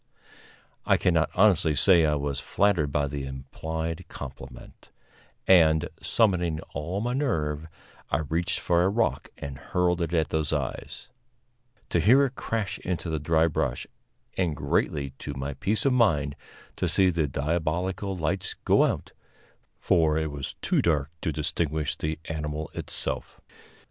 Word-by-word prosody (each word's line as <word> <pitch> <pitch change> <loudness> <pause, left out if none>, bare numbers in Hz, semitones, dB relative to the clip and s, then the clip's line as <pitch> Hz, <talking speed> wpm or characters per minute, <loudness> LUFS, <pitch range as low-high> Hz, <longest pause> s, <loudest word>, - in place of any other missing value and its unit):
I - - +3
cannot 85 -2 +2
honestly 90 -6 +4
say 85 -1 +5
I 75 - +2
was 70 -1 -2
flattered 90 -8 +1
by 75 0 +1
the 70 0 -4
implied 80 +5 -5
compliment, 65 -3 -10 0.6
and, 80 -4 +5
summoning 90 -8 +2
all 85 +8 -3
my 120 +2 -1
nerve, 80 - -1 0.4
I - - +1
reached 85 +4 -1
for 85 -1 +2
a 90 - +3
rock 115 +3 0
and 70 -2 -7
hurled 90 -1 0
it 85 -1 -1
at 80 -2 +1
those 80 -2 0
eyes, - - -4 0.8
to 85 - +2
hear 125 - +6
it 135 - -4
crash 110 -5 -3
into 90 -2 -3
the 80 - -1
dry 80 +2 +3
brush, 80 - -1 0.5
and, 85 -5 0
greatly 70 -3 0
to - - -6
my 70 +2 -4
peace 105 - 0
of 135 - +4
mind, 75 - +2 0.4
to - - 0
see 95 -1 +4
the 80 -3 0
diabolical 85 +7 -1
lights 85 +3 -2
go - - +5
out, - - -2 0.7
for 80 -2 +3
it 80 -1 -1
was 70 -2 -6
too - - +2
dark 75 -3 +1
to 80 - -1
distinguish 75 0 -1
the 75 0 -3
animal 75 -1 -4
itself. - - -3
80 Hz, 150 wpm, -27 LUFS, 75-90 Hz, 0.8 s, hear